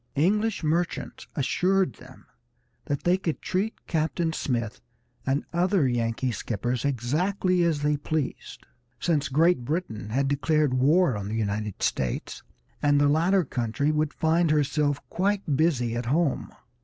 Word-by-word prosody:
English 210 Hz, +7 st, +1 dB
merchants 165 Hz, +3 st, -2 dB
assured 180 Hz, +3 st, +1 dB
them -, -, -15 dB, 0.6 s
that 145 Hz, -1 st, -2 dB
they 180 Hz, +2 st, +3 dB
could 165 Hz, -4 st, -2 dB
treat 200 Hz, +5 st, -2 dB
Captain 160 Hz, +1 st, -1 dB
Smith 115 Hz, -, -2 dB, 0.5 s
and 135 Hz, +2 st, 0 dB
other 175 Hz, -3 st, +2 dB
Yankee 120 Hz, +1 st, 0 dB
skippers 120 Hz, +2 st, -2 dB
exactly 175 Hz, -, 0 dB
as 160 Hz, -4 st, +1 dB
they 150 Hz, 0 st, +2 dB
pleased, 150 Hz, -1 st, -4 dB, 0.3 s
since 150 Hz, -4 st, 0 dB
Great 160 Hz, 0 st, +3 dB
Britain 135 Hz, -, -3 dB
had 135 Hz, +5 st, +1 dB
declared 145 Hz, 0 st, +1 dB
war 145 Hz, +3 st, +3 dB
on 100 Hz, -1 st, -4 dB
the 110 Hz, -, -3 dB
United 105 Hz, -2 st, -2 dB
States, 65 Hz, -2 st, -2 dB, 0.4 s
and 145 Hz, -1 st, +3 dB
the 145 Hz, -, +4 dB
latter 170 Hz, +5 st, +3 dB
country 125 Hz, +3 st, -1 dB
would 155 Hz, -1 st, 0 dB
find 165 Hz, +2 st, +2 dB
herself 145 Hz, -1 st, +1 dB
quite 195 Hz, -5 st, 0 dB
busy 130 Hz, -7 st, +1 dB
at 120 Hz, 0 st, -3 dB
home. 150 Hz, +2 st, +1 dB
150 Hz, 140 wpm, -26 LUFS, 125-170 Hz, 0.6 s, the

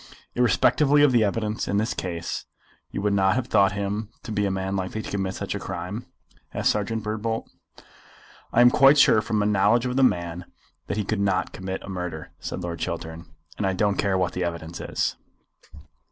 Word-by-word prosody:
"Irrespectively 145 Hz, +4 st, +4 dB
of 145 Hz, -, +6 dB
the 120 Hz, -3 st, +4 dB
evidence 105 Hz, +1 st, -1 dB
in 100 Hz, -, 0 dB
this 110 Hz, +4 st, 0 dB
case 85 Hz, -2 st, -4 dB, 0.4 s
you 100 Hz, -, -4 dB
would 105 Hz, -1 st, +2 dB
not 95 Hz, -1 st, +3 dB
have 130 Hz, -1 st, 0 dB
thought 95 Hz, -1 st, +4 dB
him 100 Hz, +1 st, -3 dB
to -, -, -7 dB
be 105 Hz, -1 st, +1 dB
a -, -, 0 dB
man 95 Hz, 0 st, -2 dB
likely 95 Hz, +3 st, -3 dB
to -, -, -7 dB
commit 95 Hz, -1 st, -2 dB
such -, -, -4 dB
a -, -, -3 dB
crime?" 90 Hz, +7 st, -5 dB, 0.5 s
asked -, -, +3 dB
Serjeant 105 Hz, +1 st, -2 dB
Birdbolt. 110 Hz, +1 st, -2 dB, 1.0 s
"I 120 Hz, -, +4 dB
am 120 Hz, 0 st, +7 dB
quite 135 Hz, +3 st, +6 dB
sure 125 Hz, -6 st, +6 dB
from 110 Hz, 0 st, -2 dB
my 105 Hz, -, +2 dB
knowledge 105 Hz, +4 st, +3 dB
of 125 Hz, +1 st, -1 dB
the -, -, +4 dB
man 85 Hz, -7 st, +1 dB, 0.4 s
that -, -, -2 dB
he 105 Hz, -, -1 dB
could 110 Hz, 0 st, -1 dB
not 95 Hz, -2 st, 0 dB
commit 95 Hz, 0 st, -5 dB
a -, -, -10 dB
murder," 90 Hz, -4 st, -5 dB
said -, -, -5 dB
Lord 85 Hz, -1 st, -4 dB
Chiltern; 80 Hz, +1 st, -5 dB, 0.3 s
"and 100 Hz, -, +1 dB
I 95 Hz, -, +1 dB
don't 100 Hz, +1 st, +1 dB
care 100 Hz, -2 st, +1 dB
what 90 Hz, -1 st, 0 dB
the 90 Hz, -, -2 dB
evidence 85 Hz, -1 st, -5 dB
is." -, -, -2 dB
100 Hz, 200 wpm, -25 LUFS, 95-110 Hz, 1.0 s, am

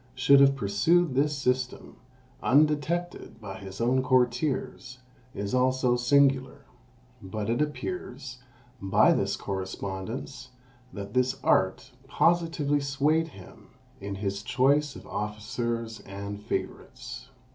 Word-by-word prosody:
should 135 Hz, +2 st, +5 dB
have 140 Hz, 0 st, +6 dB
pursued 135 Hz, -, +2 dB
this 145 Hz, +2 st, +1 dB
system, 125 Hz, -1 st, -2 dB, 0.5 s
undetected 150 Hz, +1 st, +1 dB
by 100 Hz, -3 st, -8 dB
his 95 Hz, 0 st, -9 dB
own 125 Hz, +3 st, +2 dB
courtiers, 130 Hz, 0 st, 0 dB, 0.4 s
is 100 Hz, +2 st, -4 dB
also 130 Hz, -1 st, +2 dB
singular; 135 Hz, +1 st, +2 dB, 0.6 s
but 105 Hz, +3 st, -4 dB
it 120 Hz, -, 0 dB
appears, 150 Hz, -, -5 dB, 0.4 s
by 95 Hz, -1 st, +4 dB
this -, -, 0 dB
correspondence, 100 Hz, +7 st, -5 dB, 0.4 s
that 100 Hz, -2 st, -8 dB
this 125 Hz, 0 st, +1 dB
art -, -, +1 dB, 0.2 s
positively 165 Hz, -4 st, +2 dB
swayed 145 Hz, +4 st, +1 dB
him 160 Hz, -, -14 dB, 0.3 s
in 100 Hz, 0 st, -5 dB
his 100 Hz, 0 st, -3 dB
choice 135 Hz, +5 st, +2 dB
of -, -, -11 dB
officers 110 Hz, +2 st, -4 dB
and 100 Hz, +1 st, -7 dB
favourites. 125 Hz, +4 st, -6 dB
125 Hz, 110 wpm, -27 LUFS, 105-140 Hz, 0.6 s, have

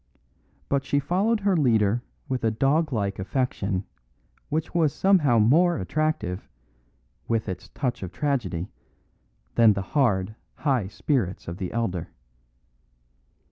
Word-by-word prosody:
But 140 Hz, -1 st, +1 dB
she 140 Hz, -, 0 dB
followed 195 Hz, +10 st, +1 dB
her 195 Hz, -1 st, +2 dB
leader 115 Hz, -, +3 dB, 0.3 s
with 130 Hz, -2 st, -2 dB
a 115 Hz, -, +3 dB
dog 140 Hz, +7 st, +1 dB
like 100 Hz, -5 st, -1 dB
affection 100 Hz, -3 st, -1 dB, 0.7 s
which 155 Hz, +1 st, -2 dB
was 160 Hz, -4 st, +3 dB
somehow 170 Hz, -11 st, +4 dB
more 160 Hz, +11 st, +4 dB
attractive, 105 Hz, -, -2 dB, 0.8 s
with 115 Hz, -2 st, 0 dB
its 95 Hz, 0 st, -6 dB
touch 125 Hz, -4 st, -3 dB
of 95 Hz, -2 st, -5 dB
tragedy, 105 Hz, -, -2 dB, 0.8 s
than 115 Hz, -2 st, +6 dB
the 100 Hz, -1 st, -3 dB
hard, 110 Hz, -9 st, +2 dB, 0.2 s
high 130 Hz, -10 st, 0 dB
spirits 105 Hz, -, -1 dB
of 85 Hz, +1 st, -5 dB
the 95 Hz, -2 st, -4 dB
elder. 105 Hz, -7 st, -2 dB
120 Hz, 125 wpm, -25 LUFS, 100-150 Hz, 0.8 s, than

